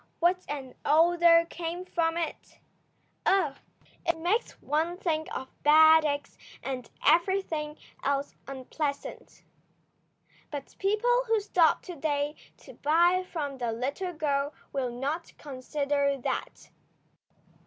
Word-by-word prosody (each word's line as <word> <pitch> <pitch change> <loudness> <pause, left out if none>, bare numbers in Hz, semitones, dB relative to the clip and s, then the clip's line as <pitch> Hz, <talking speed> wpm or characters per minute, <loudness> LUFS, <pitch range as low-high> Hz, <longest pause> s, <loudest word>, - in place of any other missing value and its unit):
What 360 +2 +2
an 275 -3 -5
odour 335 +2 +5
came 340 +2 -5
from 330 -2 0
it! 335 -2 -5 0.7
Ugh! 335 -8 +2 0.5
It 340 -1 0
makes 360 +9 -1
one 320 +4 -1
think 315 -4 -1
of 260 - -6
bad 315 +1 +7
eggs 285 -1 -3 0.2
and 255 -3 -4 0.2
everything 325 -2 +2 0.3
else 280 +1 0
unpleasant. 275 +2 -5 1.1
But 285 -2 -7
people 485 +5 +2
who 450 -1 +3
stop 360 -5 +3
to 360 - -7
day 290 -1 -1 0.2
to - - -14
buy 345 +5 +3
from 285 -5 -4
the 240 -2 -1
little 280 +11 -3
girl 290 -2 -1 0.2
will 265 -3 -1
not 280 +8 -4
consider 280 0 -1
that. - - -4
310 Hz, 115 wpm, -28 LUFS, 280-345 Hz, 1.1 s, bad